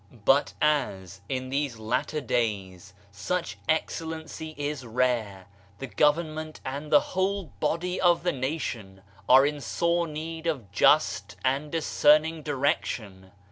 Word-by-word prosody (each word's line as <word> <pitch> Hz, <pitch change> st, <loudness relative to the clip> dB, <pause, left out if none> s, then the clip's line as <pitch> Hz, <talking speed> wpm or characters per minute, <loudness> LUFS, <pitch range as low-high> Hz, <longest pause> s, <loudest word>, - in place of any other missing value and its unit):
But 135 Hz, +2 st, +3 dB
as, 100 Hz, -, 0 dB
in 130 Hz, -1 st, -3 dB
these 140 Hz, -3 st, -1 dB
latter 125 Hz, +7 st, -2 dB
days, 100 Hz, -6 st, -2 dB, 0.2 s
such 165 Hz, -, -3 dB
excellency 160 Hz, 0 st, -3 dB
is 145 Hz, -2 st, -3 dB
rare, 115 Hz, -5 st, -1 dB, 0.3 s
the 120 Hz, -, -5 dB
government 155 Hz, +2 st, 0 dB
and 140 Hz, +3 st, -5 dB
the 145 Hz, -, +8 dB
whole 190 Hz, -1 st, -1 dB
body 175 Hz, +4 st, -1 dB
of 175 Hz, -2 st, +4 dB
the 175 Hz, -, +2 dB
nation 125 Hz, -8 st, -4 dB, 0.3 s
are 130 Hz, +2 st, +8 dB
in 145 Hz, 0 st, -2 dB
sore 170 Hz, +9 st, 0 dB
need 160 Hz, +2 st, -5 dB
of 130 Hz, -, -3 dB
just 100 Hz, -5 st, +3 dB
and 140 Hz, +3 st, 0 dB
discerning 155 Hz, 0 st, +3 dB
direc 145 Hz, 0 st, +1 dB
tion. 95 Hz, -4 st, -7 dB
145 Hz, 130 wpm, -27 LUFS, 115-160 Hz, 0.3 s, the